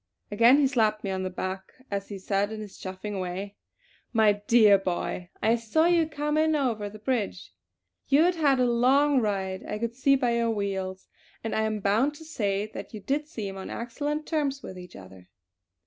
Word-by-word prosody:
Again 235 +6 +6
he 290 - +4
slapped 220 -5 +1
me 195 - -2
on 190 0 -2
the 185 - -2
back 185 +1 -5 0.2
as 200 0 -3
he 200 - -5
said 195 +2 -1
in 220 - -5
his 210 -2 -9
chaffing 190 +2 -5
way: 190 +3 -5 0.6
"My 220 -3 +4
dear 215 -4 +6
boy 180 -1 -3
I 225 +2 +4
saw 235 +8 +1
you 340 -2 +3
come 300 0 -1
in 315 0 +3
over 230 -8 -1
the 215 - -11
bridge. 215 -4 -3 0.5
You 285 +3 +5
had 355 +1 +3
had 290 -6 +2
a 250 - +4
long 260 +4 +4
ride 190 -3 -2
I - - -4
could 230 +1 -3
see 275 +3 +3
by 245 -3 +1
your 235 0 +1
wheels; 190 -3 -3 0.4
and 225 - -3
I 220 - +1
am 215 -1 -2
bound 225 +9 +2
to 320 +2 -12
say 205 -9 -1
that - - -8
you - - -6
did 285 +8 -2
seem 200 -10 -6
on 190 - -7
excellent 290 +6 -3
terms 285 -4 -1
with 185 - -8
each 180 -1 -12
other!" 95 -1 -13
220 Hz, 200 wpm, -27 LUFS, 195-275 Hz, 0.6 s, Again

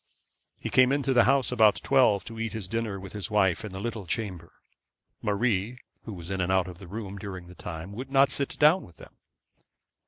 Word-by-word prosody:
He - - -5
came 130 0 +5
into 140 -1 +1
the 120 -2 +5
house 135 -1 +3
about 110 -4 +5
twelve, 125 -7 +4
and 115 0 -8
eat 115 0 -3
his 110 -4 -5
dinner 110 -1 -3
with 95 0 -10
his 105 -4 -5
wife 95 -5 +2
in 105 - -6
the 95 - -6
little 110 -3 -5
chamber. 90 -4 -4 0.7
Marie, 105 +2 0 0.3
who 110 - -6
was 85 +1 -8
in 95 -1 -1
and 90 +1 0
out 95 -1 +2
of 90 -1 -9
the 95 - -11
room 100 0 -6
during 95 -3 -7
the 90 - -13
time, 85 +1 -7
would 125 +6 -7
not 135 0 +4
sit 140 - -2
down 155 +5 +5
with 85 - -15
them. - - -14
105 Hz, 215 wpm, -27 LUFS, 95-120 Hz, 0.7 s, came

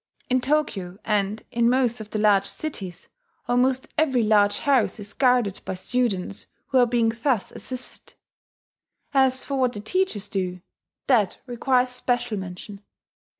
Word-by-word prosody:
In 255 0 +3
Tokyo, 245 -11 -1
and 210 0 0
in 235 -1 +3
most 245 -2 +1
of 215 - -9
the 215 - -3
large 205 -2 +3
cities, 195 - -6 0.4
almost 250 +2 +2
every 265 -7 +3
large 205 -1 +3
house 265 -5 +2
is 205 0 -9
guarded 245 -7 +2
by - - -4
students 200 -2 -2 0.2
who 265 - +3
are 245 - +5
being 235 -1 +2
thus 250 -8 +1
assisted. 255 -1 -8 1.0
As 265 -1 +4
for 275 -1 -3
what 250 -1 +2
the 205 - -6
teachers 220 - -1
do 180 -2 -3 0.4
that 220 -8 +2
requires 250 0 +1
special 245 -2 -1
mention. 190 +2 -8
240 Hz, 145 wpm, -24 LUFS, 205-255 Hz, 1.0 s, are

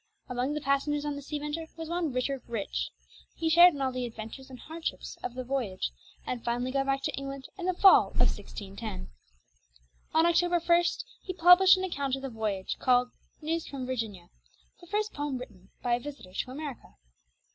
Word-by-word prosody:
Among 250 +3 -1
the 300 - -2
passengers 290 +1 +1
on 295 -1 -2
the 285 - -6
Sea 295 +2 -4
Venture 300 +2 -4
was 325 -1 -5
one 340 -2 -1
Richard 255 +1 -1
Rich. 225 -4 -2 0.5
He 325 -1 0
shared 345 0 +8
in 280 - -5
all 260 - +1
the 250 -1 -2
adventures 230 +4 -9
and 260 - -9
hardships 320 +4 -5
of 245 - -5
the 255 - -3
voyage, 245 - -2 0.3
and 245 -2 -3
finally 245 +2 -1
got 270 0 0
back 275 0 0
to - - -1
England 275 -1 -6
in 365 -2 -4
the 370 - +1
fall 385 +1 +7
of - - -15
1610. 190 - -2 1.1
On 320 +1 +6
October 345 +1 +3
1 340 +1 +4 0.4
he 370 - -5
published 360 +2 +8
an 370 - -2
account 280 -7 -1
of 270 - -8
the 270 - -4
voyage, 210 -4 -2
called 250 -1 +3 0.3
"Newes 325 +1 -1
from 270 -2 -5
Virginia," 220 -9 -4 0.5
the 350 - -15
first 420 +3 -1
poem 290 -2 -2
written 200 -7 -11
by 245 - +2
a 240 - +2
visitor 275 -9 -9
to 225 - -2
America. 270 - -7
275 Hz, 190 wpm, -29 LUFS, 245-325 Hz, 1.1 s, shared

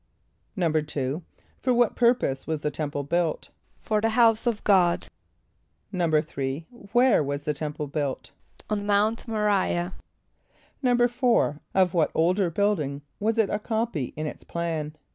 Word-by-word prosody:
= - - -38
=2.= 155 -3 -1 0.4
For 250 -1 +1
what 240 -2 +3
purpose 235 - +2
was 160 -2 -2
the 150 - -1
temple 145 -1 -3
built? 165 +2 -1 0.3
=For 215 -1 0
the 225 - +2
house 225 0 +4
of 230 -3 0
God.= 180 -4 +3 0.9
=3.= 155 -4 0 0.3
Where 245 -7 +4
was 140 +1 -3
the 150 0 -1
temple 150 0 -4
built? 140 -2 -3 0.4
=On 210 -1 -1
Mount 210 +2 +1
M[+o] 225 - -3
r[=i]´ah.= 190 -4 +1 0.9
=4.= 245 - +2 0.2
Of 185 -2 +3
what 165 -3 +3
older 180 +3 +2
building 160 -7 0 0.2
was 225 +2 0
it 220 -3 +2
a 205 - 0
copy 220 - -1
in 155 - -2
its 150 - -6
plan? 160 -3 -3
175 Hz, 145 wpm, -26 LUFS, 150-220 Hz, 0.9 s, house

